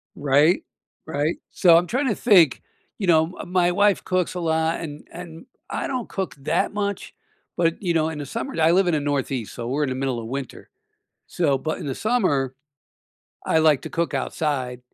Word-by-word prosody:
Right? 145 +4 +3 0.4
Right? 155 +1 -1
So, 170 -3 +6
I'm 175 +1 +1
trying 260 +4 0
to 220 - +1
think, 180 - +4 0.4
you 195 - -3
know, 160 +1 +3
uh, - - -5
my 180 -1 +2
wife 205 +1 +2
cooks 185 -1 0
a 180 - -4
lot 160 0 0
and 150 -2 -8
and 165 -2 -10 0.2
I - - -3
don't 255 -4 -3
cook 190 -1 -4
that 135 - 0
much, 200 -1 -3 0.4
but, 165 +1 +1
you 175 -3 0
know, 160 -1 +1
in 155 -2 -6
the 145 - -5
summer- 230 - -5
I 160 +1 +5
live 185 +1 +3
in 175 - +2
the 155 - +2
Northeast, 135 -5 -2
so 120 -1 -6
we're 145 +4 0
in 140 - -1
the 130 - -2
middle 130 -2 -2
of 110 - -7
winter, 135 +1 -6 0.6
so- 145 -6 +1
but 155 +4 -3
in - - -6
the 135 - -3
summer, 150 - 0 0.9
I 160 - +3
like 155 -4 +4
to - - -7
cook 170 0 -1
outside 130 -5 -2
160 Hz, 200 wpm, -23 LUFS, 140-180 Hz, 0.9 s, So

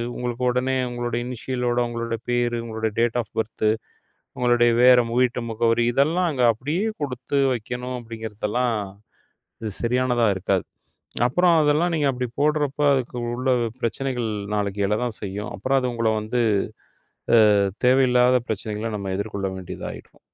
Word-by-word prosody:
உங்களுக்கு 125 0 -3
உடனே 125 +1 0
உங்களோட 120 -1 -3
இனிஷியல் 125 0 -4
ஓட 120 0 +1
உங்களோட 115 -1 -3
பேரு, 120 -1 +1
உங்களோட 110 -1 -2
டேட் 120 0 +2
ஆஃப் 115 - -12
பர்த், 110 0 -2 0.7
உங்களோட 120 -1 +3 0.2
வேற 125 -1 +7 0.2
வீட்டு 125 -1 +2
முகவரி 115 +1 +2
இதெல்லாம் 165 +8 +2
அங்க 130 -5 +1
அப்படியே 145 - -2 0.2
கொடுத்து 135 0 -2
வைக்கணும் 125 +2 -4
அப்படிங்குறதெல்லாம், 115 +1 -2 0.9
இது 110 - -3
சரியானதா 120 -1 +2
இருக்காது. 95 -1 0 0.6
அப்புறம் 175 +6 +3
அதெல்லாம் 155 +4 +2
நீங்க 150 -3 +1
அப்படி 125 -1 -3
போடுறப்ப 150 -1 +1
அதுக்கு 125 -2 -2 0.2
உள்ள 130 +2 -1 0.3
பிரச்சனைகள் 120 0 -2 0.3
நாளைக்கு 100 -1 -1
எழதான் 110 +1 -1
செய்யும். 100 +1 -5
அப்புறம் 135 +7 +1
அது 125 -1 -1
உங்கள 115 -1 +1
வந்து 120 +3 -1 1.0
அஹ், 105 -3 +5 0.2
தேவையில்லாத 125 -1 +5
பிரச்சனைகள 110 +1 -3
நம்ம 100 -1 -4
எதிர்கொள்ள 100 -1 -3
வேண்டியதாயிடும். 95 -2 -8
120 Hz, 135 wpm, -23 LUFS, 110-130 Hz, 1.0 s, வேற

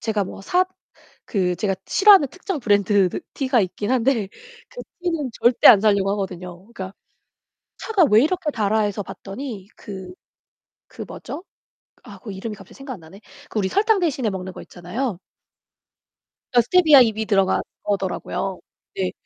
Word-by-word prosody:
제가 215 -3 -1
뭐 190 - -9
사 360 - +2 0.6
그 180 -5 0
제가 195 +1 -1
싫어하는 390 -7 +6
특정 370 -1 -5
브랜드 205 -4 +3 0.3
티가 260 -4 +2
있긴 205 +4 -3
한데 245 -4 +1 0.4
그 - - -9 0.2
티는 330 -6 -2
절대 240 0 +5
안 205 - +9
사려고 200 -2 +2
하거든요. 180 -3 -5 0.2
그러니까 190 -2 -7 0.8
'차가 415 -6 +2
왜 215 +2 +7
이렇게 340 -1 -1
달아?' 215 -2 +1
해서 205 -1 -2
봤더니 200 0 -8
그 190 -3 -9 0.8
그 - - -9
뭐죠? 350 - -8 0.6
아 - - -12
그 215 - -8
이름이 210 +3 -6
갑자기 195 -2 -15
생각이 270 -2 -7
안 - - -14
나네. 165 +6 -15 0.3
그 215 - -2
우리 190 - 0
설탕 425 - +2
대신에 275 - 0
먹는 190 0 -6
거 - - -9
있잖아요. 190 +4 -5 1.3
스테비아 290 +4 +6
잎이 220 -2 +1
들어간 195 -3 +2 0.2
거더라고요. 195 -1 -3 0.4
네. 190 -1 -1
215 Hz, 310 characters per minute, -22 LUFS, 195-275 Hz, 1.3 s, 안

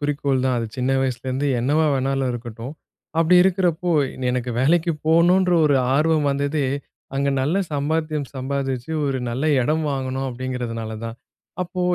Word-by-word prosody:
குறிக்கோள் 145 -2 0
தான். 130 -1 +1
அது 115 - -2
சின்ன 130 +1 0
வயசுலேருந்து 130 +1 -1
என்னவா 150 +6 +2
வேணாலும் 135 0 0
இருக்கட்டும். 120 +1 -7 0.5
அப்படி 165 +2 +4
இருக்கிறப்போ, 180 -2 +1 0.4
எனக்கு 125 0 -2
வேலைக்கு 165 +5 +3
போணுன்ற 180 +3 +4
ஒரு 145 -2 +4 0.2
ஆர்வம் 155 0 +2
வந்ததே, 140 +1 0 0.5
அங்க 140 +1 +1
நல்ல 150 +8 +1 0.2
சம்பாத்தியம் 150 0 -1
சம்பாதிச்சு 135 0 -3 0.2
ஒரு 135 -1 -1
நல்ல 130 +5 -2 0.2
இடம் 155 +5 +1
வாங்கணும் 135 -1 -2
அப்படீங்கிறதுனால 120 -3 -4
தான். 115 0 -6 0.5
அப்போ 180 +1 -5
140 Hz, 135 wpm, -22 LUFS, 130-155 Hz, 0.5 s, அப்படி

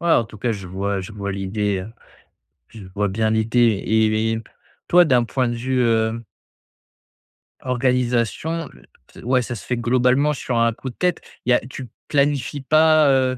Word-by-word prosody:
Ouais 170 -1 +2
en 115 - +4
tout 110 -1 -13
cas 115 +1 -1
je 95 -3 -7
vois 100 +1 -2
je 95 +3 -9
vois 100 -1 -4
l'idée, 100 +1 -2
heu, 105 +4 -9 0.8
je 105 -4 -12
vois 105 0 0
bien 110 +3 0
l'idée. 110 -1 +2
Et 110 0 +2
et 115 0 -3 0.5
toi 175 0 +6
d'un 125 -5 +3
point 125 +1 -1
de 120 - -2
vue 130 +2 -1
heu 115 -1 +1 1.4
organisation 125 +5 -1 0.6
ou 125 - -3
ouais 130 -1 +4
ça 120 0 -5
se - - -10
fait 125 - -2
globalement 130 +5 +2
sur 125 -3 -3
un 115 -1 +2
coup 130 - -7
de - - -12
tête. 180 -2 0 0.2
Il 125 - +1
y - - +7
a - - +4
tu 125 +1 -9 0.2
planifies 140 -1 0
pas, 155 +1 +4
heu 130 -1 +2
120 Hz, 185 wpm, -21 LUFS, 110-130 Hz, 1.4 s, y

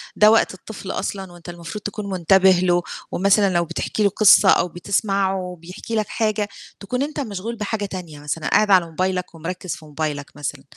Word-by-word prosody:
ده 210 0 +6
وقت 225 - +3
الطفل 190 0 -8
أصلًا 195 -2 -4
وأنت 175 0 -12
المفروض 175 +4 -7
تكون 205 0 -5
منتبِه 190 +1 +4
له، 175 -1 +3 0.3
ومثلًا 200 +1 +3
لو 170 0 +2
بتحكي 210 - -2
له 200 - +5
قصّة 200 0 +6
أو - - +4
بتسمعه 190 0 -1
بيحكي 180 +6 -7
لك 215 -1 0
حاجة، 215 -2 -1 0.3
تكون 250 +6 -2
أنت 295 +1 -4
مشغول 225 -3 -4
بحاجة 210 -1 -3
تانية 180 -6 -7
مثلًا، 150 +2 -4
قاعد 210 -1 +3
على 185 -3 +6
موبايلك 180 +2 -2
ومِركِّز 180 +2 -5
في 155 - -14
موبايلك 150 -1 -4
مثلًا، 145 -1 -5
190 Hz, 180 wpm, -21 LUFS, 175-205 Hz, 0.3 s, ده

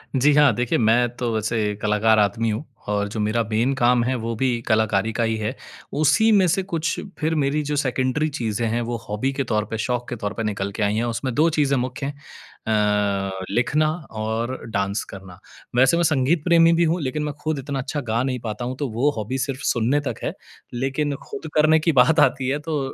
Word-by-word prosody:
जी 140 +3 +4
हाँ 145 -4 +6
देखिए, 125 +1 0
मैं 120 +2 +3
तो 120 -2 -1
वैसे 110 -1 -1
कलाकार 105 +1 +3
आदमी 110 +2 +1
हूँ 110 +8 -3 0.2
और 105 0 0
जो 110 +2 -5
मेरा 110 +2 +1
मेन 115 +5 +2
काम 120 -1 +3
है, 130 +2 0
वो 115 -1 -3
भी 125 0 0
कलाकारी 110 -1 +2
का 120 - 0
ही 110 0 0
है, 110 +4 -3 0.4
उसी 155 +10 +3
में 200 -3 +5
से 180 +3 +1
कुछ 165 -4 -2 0.2
फिर 160 +1 0
मेरी 145 0 +1
जो 150 +1 -2
सेकेंडरी 135 +2 0
चीज़ें 115 -5 -2
हैं, 115 +2 -1
वो 120 0 -3
हॉबी 105 +6 -1
के 135 0 -1
तौर 110 -4 -1
पे, 110 +1 -5
शौक 120 +2 -2
के 120 - -3
तौर 105 -2 -4
पे 115 - -4
निकल 100 -2 -2
के 105 +2 -2
आई 100 +1 +1
हैं, 110 - 0
उसमें 120 +2 -2
2 155 +3 +4
चीज़ें 145 -3 +1
मुख्य 130 +2 -3
हैं 140 - -3 0.5
अ, 100 -3 0
लिखना 150 +8 +1 0.2
और 110 +3 -3
डांस 100 0 -1
करना। 95 -2 -11 0.4
वैसे 130 +6 +4
मैं 170 - +2
संगीत 150 0 +2
प्रेमी 170 -1 +5
भी 170 +1 +3
हूँ, 165 +2 +1
लेकिन 150 +2 -2
मैं 150 -1 -3
खुद 155 -2 -1
इतना 135 0 -4
अच्छा 145 +3 -3
गा 115 +2 +1
नहीं 130 -1 -2
पाता 120 +1 -5
हूँ, 125 +1 -3
तो 145 - -2
वो 120 +7 +2
हॉबी 110 +5 -3
सिर्फ़ 135 +1 -3
सुनने 125 +4 +1
तक - - -2
है, - - -2 0.4
लेकिन 135 +4 -1
खुद - - -6
करने 155 +1 +5
की 165 +2 +2
बात 160 +4 +3
आती 135 -3 +3
है 140 +2 0
तो, 150 0 -2
125 Hz, 220 wpm, -22 LUFS, 110-145 Hz, 0.5 s, हाँ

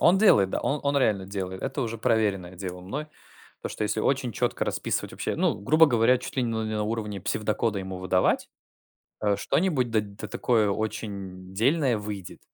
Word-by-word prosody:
Он 180 +3 +5
делает, 105 - +5
да, - - -1
он 145 +1 0
он 140 0 +1
реально 105 -8 +2
делает. 95 -1 -5
Это - - -2
уже 115 -1 -3
проверенное 105 -6 +1
дело 90 0 -6
мной, 135 +12 -5 0.5
потому - - -5
что, - - -4
если 105 +1 0
очень 130 0 +1
четко - - 0
расписывать - - -2
вообще, - - -2
ну, - - +2
грубо 155 +10 +5
говоря, 125 -1 +4
чуть 125 - -8
ли 130 - +2
н 120 - 0 0.2
не 110 - -2
на 105 - 0
уровне 105 -2 -3
псевдокода 105 +2 0
ему 95 -1 -5
выдавать, 95 0 +1 0.7
э, 105 -2 +2
что-нибудь 150 -9 +1
д 110 -1 +3
да 100 0 -9
такое 110 -4 +2
очень 100 -3 -4
дельное 130 +2 +2
выйдет. 105 -3 -7
110 Hz, 185 wpm, -27 LUFS, 100-125 Hz, 0.7 s, Он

